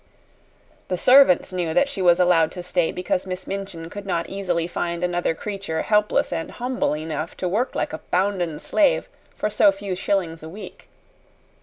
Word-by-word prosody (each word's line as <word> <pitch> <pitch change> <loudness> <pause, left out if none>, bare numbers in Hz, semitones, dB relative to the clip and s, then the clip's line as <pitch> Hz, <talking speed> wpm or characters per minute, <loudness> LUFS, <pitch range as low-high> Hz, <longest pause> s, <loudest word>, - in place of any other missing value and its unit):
The 180 - -1
servants 250 -7 +5
knew 170 -3 -2
that 275 - +4
she 250 -9 -4
was 175 -1 +5
allowed 170 -3 +4
to 180 - -7
stay 175 -2 0
because 180 +1 -2
Miss 185 0 -5
Minchin 195 -4 -5
could 205 -1 -8
not 170 -3 -1
easily 180 -4 -1
find 170 0 -3
another 175 -2 0
creature 195 -5 -4
helpless 210 -3 +2
and 165 -1 -3
humble 250 -9 -1
enough 155 +1 -5
to 185 - -2
work 220 +8 -1
like - - -2
a 160 - -4
bounden 180 -4 0
slave - - +2 0.3
for 210 - -2
so 200 - +5
few 195 -1 -5
shillings 180 -3 -1
a 160 - -8
week. 200 +6 -11
180 Hz, 175 wpm, -23 LUFS, 170-200 Hz, 0.3 s, servants